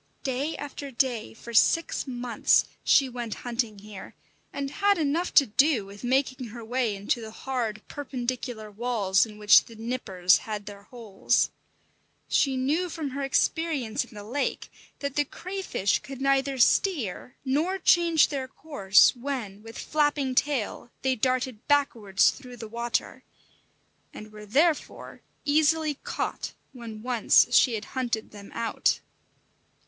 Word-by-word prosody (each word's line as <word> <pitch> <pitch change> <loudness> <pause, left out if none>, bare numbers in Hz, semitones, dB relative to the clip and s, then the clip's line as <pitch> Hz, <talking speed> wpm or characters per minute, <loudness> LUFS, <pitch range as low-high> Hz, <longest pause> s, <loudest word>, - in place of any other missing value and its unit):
Day 275 +3 -2
after 285 0 -7
day 245 -4 -1
for 235 +1 -10
six 330 +7 +3
months 245 -2 +2 0.2
she 275 - +4
went 240 -3 -5
hunting 235 -3 -2
here, 205 -1 -11 0.4
and 275 -1 -4
had 400 +4 +2
enough 320 +3 0
to 280 - +8
do 260 0 +2
with 200 +3 -12
making 260 0 0
her 230 +1 -9
way 240 -2 0
into 200 +5 -1
the 220 - -7
hard, 225 -3 -4
perpendicular 245 -5 -5
walls 210 -3 +1
in 210 -1 -12
which 210 0 +6
the 230 - -13
nippers 215 -6 +1
had 210 -2 -6
their 200 -1 -9
holes. 220 -5 0 0.8
She 270 -2 +2
knew 305 +8 0
from 310 -4 -4
her 280 +2 -4
experience 275 -3 0
in - - -16
the 205 - -8
lake 255 +7 -3 0.3
that 280 -1 -3
the 290 - +3
crayfish 365 - -2
could 270 -1 -9
neither 275 0 +1
steer 250 - +1
nor 310 +9 0
change 340 -3 +4
their 270 -3 -3
course 205 -10 +3
when, 240 -6 -5
with 225 +1 -11
flapping 290 -3 0
tail, 255 -4 -1
they 265 -1 +2
darted 255 -1 -1
backwards 230 -9 +3
through 250 -3 -12
the 225 - -7
water, 235 +2 -3 0.9
and 215 0 -10
were 210 0 -11
therefore 300 +8 0 0.2
easily 310 +1 +3
caught 285 - -4 0.2
when 225 -4 -9
once 245 0 +4
she 245 -4 +5
had 210 -1 -5
hunted 240 -4 -2
them 200 -1 -12
out. 230 -1 0
250 Hz, 145 wpm, -27 LUFS, 220-280 Hz, 0.9 s, to